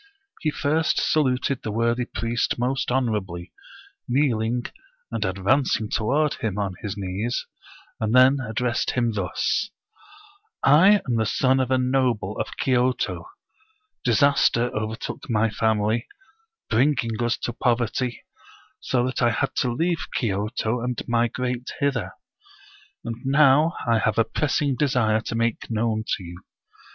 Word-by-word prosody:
He 155 - 0
first 155 +2 +1
saluted 135 -3 +1
the 110 - -4
worthy 115 +3 0
priest 115 0 -2
most 130 +2 -1
honorably, 105 -9 -2 0.5
kneel 125 -3 +2
ing, 120 +2 -1 0.5
and - - -2
advancing 105 +4 +1
toward 145 +7 +1
him 105 -3 -3
on 100 -2 -1
his 105 0 -5
knees, 100 +5 -3 0.5
and 110 +2 0
then 130 +2 +6
addressed 120 0 -1
him 120 -2 +1
thus: 100 - -1 0.5
" 410 -1 -25 0.2
I 185 +9 +6
am 120 -2 +1
the 110 -1 +1
son 130 +3 +2
of 130 -1 0
a 130 - +3
noble 125 -6 0
of - - -4
Kyoto; 125 - 0 0.7
disaster 125 0 +3
overtook 110 +4 -5
my 110 -1 +2
family, 110 +1 0 0.6
bringing 120 -2 +1
us 120 0 +1
to 120 - -4
poverty, 120 0 -1 0.6
so 125 -1 0
that 130 - -2
I 120 - +4
had 135 +4 -1
to 125 - +1
leave 165 +6 -1
Kyoto 110 +2 -1
and 125 0 -2
migrate 120 +1 -1
hither. 140 -1 -1 0.9
And 115 -1 -4
now 150 +4 +4
I 115 -1 +3
have 110 -1 0
a 115 - +5
pressing 145 +1 0
desire 120 -6 +1
to 115 - -5
make 115 0 -1
known 110 -1 -1
to - - -11
you. 85 0 -10
120 Hz, 140 wpm, -24 LUFS, 110-130 Hz, 0.9 s, then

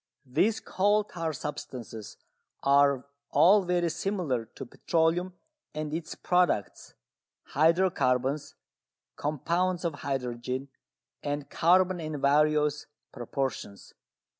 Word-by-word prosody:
These 175 - +1
coal 205 +2 +2
tar 165 -5 -4
substances 125 -7 -7 0.5
are 140 -1 +4 0.2
all 200 +5 +6
very 175 -2 0
similar 165 - -2
to 120 - -10
petroleum 170 +7 0 0.4
and 155 -1 -4
its 160 -1 -4
products, 180 - 0 0.5
hydro 170 +5 +3
carbons, 130 0 0 0.6
compounds 170 +5 -1
of 165 - 0
hydrogen 130 0 -3 0.5
and 145 0 -4
carbon 180 +2 +3
in 155 -2 -4
various 150 +1 +2 0.2
proportions. 120 -4 -5
150 Hz, 95 wpm, -28 LUFS, 135-175 Hz, 0.6 s, all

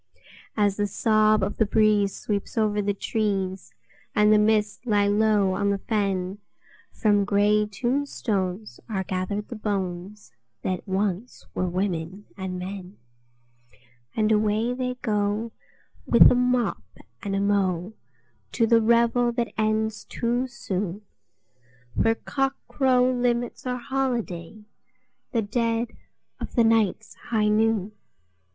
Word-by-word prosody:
As 205 -2 +2
the 205 0 +1
sob 215 +1 +3
of 205 - -2
the 220 - +3
breeze 210 -2 +3
sweeps 205 +2 -3
over 210 -1 +2
the 205 0 0
trees, 195 -3 -2 0.4
and 210 -1 +5
the 210 - +5
mists 210 0 +1
lie 210 -4 +2
low 205 -1 +3
on 200 +1 0
the 200 - +1
fen, 195 -2 -2 0.5
From 205 -2 +2
grey 210 +1 +2
tombstones 215 -4 -2
are 195 -3 -1
gathered 190 +3 -3
the 240 - -6
bones 195 - -4 0.3
that 185 +2 -3
once 195 +4 -2
were 185 - -1
women 185 +1 -3
and 190 -2 -5
men, 185 +1 -7 1.2
And 215 0 +2
away 215 +2 +2
they 250 0 -3
go, 210 +1 0 0.6
with 235 - +8
a - - +5
mop 250 -1 +1 0.4
and 195 -1 -3
a - - +1
mow, 195 -1 0 0.6
to 230 - +3
the 230 0 +4
revel 235 +1 +3
that 235 -3 -2
ends 215 0 0
too 240 +2 -1
soon, 205 -5 -4 1.0
For 225 0 +3
cockcrow 255 -1 0
limits 245 +1 -1
our 250 0 -1
holiday—the 240 0 -5
dead 230 +2 0 0.5
of - - -7
the 235 - +5
night's 220 -2 +1 0.2
high 215 -2 +2
noon! 215 -1 +1
210 Hz, 125 wpm, -25 LUFS, 200-230 Hz, 1.2 s, with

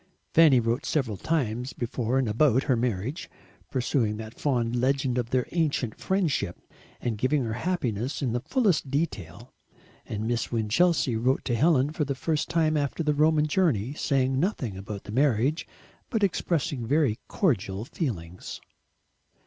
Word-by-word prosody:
Fanny 155 -6 +7
wrote 120 +5 0
several 130 -9 -1
times 125 - -1
before 120 +1 -1
and 135 -3 +1
about 130 +4 +3
her 130 - +2
marriage, 120 - -2 0.4
pursuing 125 -4 0
that 110 0 -7
fond 120 -4 0
legend 130 0 +1
of 120 -2 -3
their 125 -1 +1
"ancient 150 -9 0
friendship," 190 -6 0 0.4
and 115 -4 -3
giving 135 +3 +2
her 110 -2 -2
happiness 125 - -2
in 130 -5 -1
the 120 - 0
fullest 195 - +1
detail. 135 - -3 0.5
And 105 0 -3
Miss 120 -1 -1
Winchelsea 120 +5 +2
wrote 130 +4 +1
to 120 - 0
Helen 145 +1 +3
for 155 0 -1
the 140 -1 -2
first 155 +2 -1
time 160 -2 +2
after 145 +2 -1
the 150 -1 +2
Roman 155 +1 +3
journey, 145 - +1
saying 135 -3 +1
nothing 140 - -1
about 100 +1 -7
the - - -8
marriage, 135 +4 +1 0.4
but 225 -4 0
expressing 165 - 0
very 140 -4 +2
cordial 105 - 0
feelings. 90 - -5
130 Hz, 150 wpm, -27 LUFS, 115-155 Hz, 0.5 s, Fanny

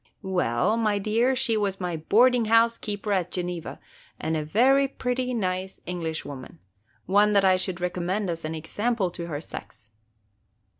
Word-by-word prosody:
"Well, 185 - +1
my 215 -3 +1
dear, 225 +6 +1
she 230 -2 +2
was 200 -2 -1
my 180 -2 -2
boarding 235 +9 +3
house 230 +1 +4
keeper 205 0 -4
at 185 -4 +1
Geneva, 175 -2 -5 0.4
and 160 +1 -1
a 155 - -1
very 260 - +4
pretty, 255 -1 -2
nice 190 -4 -2
Englishwoman, 160 - -5 0.3
– - - -37
one 205 +3 +4
that 200 -1 +4
I 185 -1 +5
should 185 -1 -3
recommend 180 +3 -2
as 165 -1 -4
an 155 +1 -3
example 200 +4 -1
to 170 -1 -6
her 145 -3 -4
sex." 110 -7 -10
190 Hz, 160 wpm, -26 LUFS, 170-225 Hz, 0.4 s, I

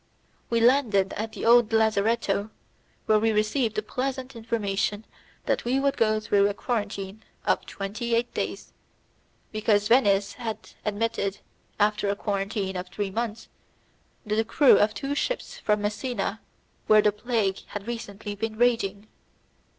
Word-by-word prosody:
We 230 - +2
landed 230 -6 +3
at 220 +1 -4
the - - -5
old 235 -1 +6
lazzaretto, 220 -1 +1 0.6
where 215 -1 +4
we 225 +1 +2
received 215 +2 +1
the 215 - -1
pleasant 260 +3 -4
information 210 -2 -2 0.4
that - - 0
we 255 +3 +1
would 275 0 +1
go 215 -1 +2
through 200 -1 +3
a 200 - -4
quarantine 205 -3 -3 0.2
of - - +1
twenty 225 +4 -3
eight 235 +1 -1
days, - - -4 0.8
because 215 -1 +2
Venice 205 -5 +3
had 225 -2 -6
admitted, 205 -2 -1 0.4
after 210 0 +2
a 200 - +1
quarantine 200 -1 -2
of 180 0 -4
three 200 -1 -3
months, 225 +1 -3 0.8
the 215 +1 +1
crew 275 +5 +5
of 210 0 +2
two 275 +8 -3
ships - - -3
from 210 -1 +1
Messina, 210 0 -2 0.5
where 215 -1 +6
the 210 - +4
plague 210 -2 -1
had 205 -1 -6
recently 215 -3 -5
been 215 +1 -4
raging. 220 -4 +1
215 Hz, 145 wpm, -26 LUFS, 205-230 Hz, 0.8 s, old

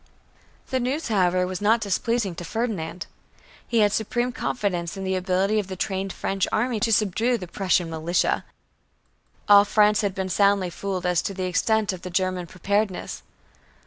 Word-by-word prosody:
The 260 - +1
news, 260 +4 -2
however, 185 -3 +2
was 185 0 -5
not 220 +3 +4
displeasing 210 0 -1
to 170 - -7
Ferdinand. 185 -4 -3 0.6
He 230 -2 +2
had 205 -1 +3
supreme 240 +3 -1
confidence 195 -8 -2
in 195 - -5
the 190 0 -1
ability 190 +3 +1
of 200 - -3
the 190 - -5
trained 190 +1 -2
French 195 +1 -1
army 235 0 0
to 225 - +1
subdue 225 +3 +2
the 185 - -7
"Prussian 185 -1 +1
militia." 165 +2 0 1.0
All 205 -1 +8
France 210 0 +3
had 200 -2 -1
been 190 -1 -3
soundly 200 -1 +2
fooled 190 0 -4
as 180 -2 +2
to 195 - -4
the 185 -1 -2
extent 210 +3 +1
of 180 - -8
the 185 - -6
German 185 0 -1
preparedness. 200 +2 -2
195 Hz, 170 wpm, -24 LUFS, 185-215 Hz, 1.0 s, All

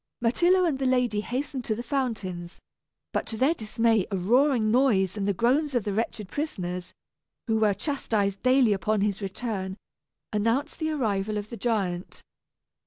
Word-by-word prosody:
Myrtillo 350 +11 +3
and 295 -6 0
the 265 - +1
lady 250 -5 +2
hastened 260 +3 -3
to 220 - 0
the 240 - -5
fountains; 215 -10 -3 0.6
but - - -1
to 225 - -5
their 270 +7 +3
dismay 225 - +1
a 195 - -1
roaring 235 +3 +3
noise 215 -7 +3
and 200 -2 -2
the - - +3
groans 265 - +2
of 240 - +2
the 205 - -2
wretched 215 -1 -2
prisoners, 180 - -4 0.5
who 220 -1 +1
were 210 -2 +3
chastised 205 -9 -1
daily 255 -3 +4
upon 210 +1 0
his 205 0 0
return, 195 -1 -4 0.6
announced 230 +7 0
the 315 -1 -1
arrival 215 -8 -1
of 205 0 -5
the - - -4
giant. 195 -7 -2
220 Hz, 165 wpm, -27 LUFS, 200-260 Hz, 0.6 s, daily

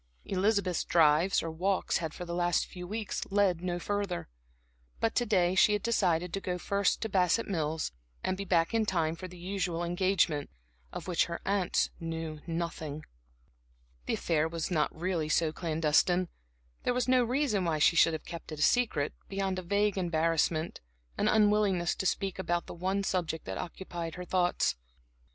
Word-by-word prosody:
Elizabeth's 195 -2 +1
drives, 165 +3 +4
or 165 - -3
walks 185 +4 0
had 160 -3 -3
for 180 - -7
the 170 - -5
last 175 0 +1
few 180 -1 -9
weeks 215 +1 -3
led 195 -4 +2
no 180 -1 -2
further. 200 - -3 0.7
But 225 - +1
to 240 - +1
day 180 -4 +3
she 200 +3 +5
had 210 - -1
decided 180 -7 +1
to 195 - -2
go 180 -1 -2
first 200 +1 0
to - - -1
Bassett 190 +3 +2
Mills, 160 -4 -1 0.3
and 185 - 0
be 200 - -4
back 170 0 +2
in 225 -1 +2
time 165 -4 +1
for 185 +2 -7
the 180 0 -12
usual 180 -2 -2
engagement, 175 -4 +1 0.4
of - - -7
which 175 -3 +2
her 170 - -5
aunts 195 -2 +1
knew 165 -2 -5
nothing. 165 -3 -4 1.0
The - - +1
affair 160 -1 +1
was 165 +1 -4
not 155 -4 +2
really 165 -2 -2
so 160 0 +2
clandestine. 165 +2 +2 0.5
There 245 - 0
was 250 0 0
no 255 -1 +4
reason 240 -5 +1
why 165 -3 0
she 155 +3 +4
should 165 0 +5
have 160 - -5
kept 170 -1 -8
it 155 - -6
secret 195 -13 +2 0.2
beyond 195 -1 -1
a - - -4
vague 200 +2 +1
embarrassment, 165 -1 0 0.3
an - - 0
unwillingness 205 -4 +3
to 190 - 0
speak 190 +1 -1
about 175 -2 -1
the - - -8
one 190 +3 -1
subject 170 -4 -2
that 95 0 -4
occupied 170 -2 -6
her 180 0 -6
thoughts. 180 0 +1
180 Hz, 175 wpm, -30 LUFS, 165-195 Hz, 1.0 s, she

